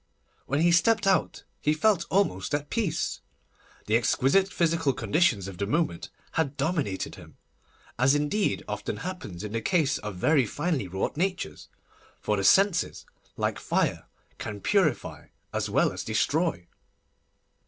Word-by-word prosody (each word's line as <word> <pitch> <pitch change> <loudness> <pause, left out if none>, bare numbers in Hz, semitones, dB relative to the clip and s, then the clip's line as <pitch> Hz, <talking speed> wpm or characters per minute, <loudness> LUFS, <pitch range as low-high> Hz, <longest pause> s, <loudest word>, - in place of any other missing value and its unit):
When 140 +4 0
he 175 +1 +4
stepped 215 +5 +3
out 195 -1 +1 0.2
he 150 +1 +2
felt 180 0 +2
almost 145 - +1
at 145 0 -4
peace. 225 -8 -1 0.6
The 110 - +1
exquisite 135 - +3
physical 165 -4 +1
conditions 125 - +1
of 95 -3 -9
the 100 - -1
moment 150 - -1 0.2
had 140 0 -1
dominated 150 - -1
him, - - -14 0.6
as 135 +3 +4
indeed 150 +8 0
often 105 0 -4
happens 180 - -6
in 105 - -5
the 115 +1 -2
case 155 0 +1
of 105 -2 -6
very 135 - +3
finely 150 - -1
wrought 95 +9 -3
natures, 180 - -3 0.5
for 105 - 0
the 100 - -1
senses, 190 - +3 0.3
like - - -1
fire, - - -1 0.3
can 105 -1 -5
purify 175 - 0 0.3
as - - -1
well - - +2
as - - -5
destroy. 140 - 0
150 Hz, 145 wpm, -27 LUFS, -, 0.6 s, he